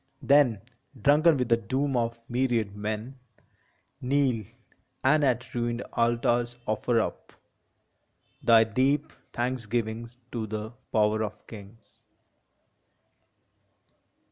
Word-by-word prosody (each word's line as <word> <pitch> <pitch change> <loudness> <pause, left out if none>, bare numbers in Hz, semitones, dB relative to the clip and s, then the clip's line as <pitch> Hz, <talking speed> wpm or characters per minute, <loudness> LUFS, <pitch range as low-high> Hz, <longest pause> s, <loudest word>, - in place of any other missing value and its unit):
Then, 135 -8 +4 0.4
drunken 150 +6 +4
with 125 -2 -1
the 115 - +5
doom 130 +5 -1
of 115 -1 -1
myriad 120 -5 0
men, 110 +5 -5 0.8
Kneel, 130 -4 +1 0.6
and 150 +3 +4
at 125 -3 0
ruined 120 0 -2
altars 120 +1 +1
offer 115 +2 +1
up - - -4 1.1
Thy 115 -1 +6
deep 135 +7 0 0.2
thanksgiving 115 -2 -2 0.2
to 115 -3 -3
the 110 +1 -5 0.2
power 110 0 +2
of 105 0 -7
kings 105 +1 -14
120 Hz, 95 wpm, -27 LUFS, 110-130 Hz, 1.1 s, Thy